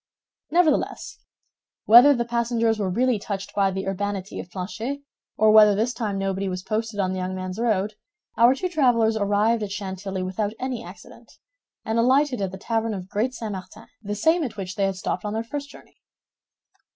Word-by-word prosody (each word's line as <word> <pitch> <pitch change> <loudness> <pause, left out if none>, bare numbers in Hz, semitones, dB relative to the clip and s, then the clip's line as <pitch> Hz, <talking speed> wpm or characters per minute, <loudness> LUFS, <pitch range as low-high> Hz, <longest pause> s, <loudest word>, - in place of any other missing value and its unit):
Nevertheless, 330 -3 +1 0.7
whether 245 +6 +8
the 235 -1 -1
passengers 235 -1 0
were 195 -2 0
really 240 +3 +1
touched 195 -1 -5
by 195 -1 +2
the 190 0 -4
urbanity 195 0 -3
of 175 - -8
Planchet 225 +10 -5 0.3
or 215 0 +5
whether 210 -1 +7
this 230 +4 0
time 220 -5 -3
nobody 195 0 -2
was 185 0 -4
posted 220 0 -3
on 185 -2 +1
the 190 - -3
young 185 +1 -3
man's 185 +2 -5
road, 215 -3 0 0.4
our 235 +4 +5
two 365 - -2
travelers 245 -9 +2
arrived 210 +2 +1
at 210 - -3
Chantilly 190 -1 -4
without 205 +3 -2
any 255 -3 -3
accident, - - -14 0.5
and 220 +1 0
alighted 260 0 +3
at 195 - -1
the 190 - -7
tavern 225 +1 -1
of 185 -1 -8
Great 230 +6 -1
St. 220 -3 -5
Martin, 195 +3 -9 0.2
the 205 -1 -4
same 320 - +2
at 245 -6 -5
which 190 -2 -5
they 200 - +1
had 195 - -2
stopped 185 - -3
on 210 0 -3
their 225 +1 -2
first 280 +4 -6
journey. - - -17
215 Hz, 190 wpm, -24 LUFS, 195-235 Hz, 0.7 s, whether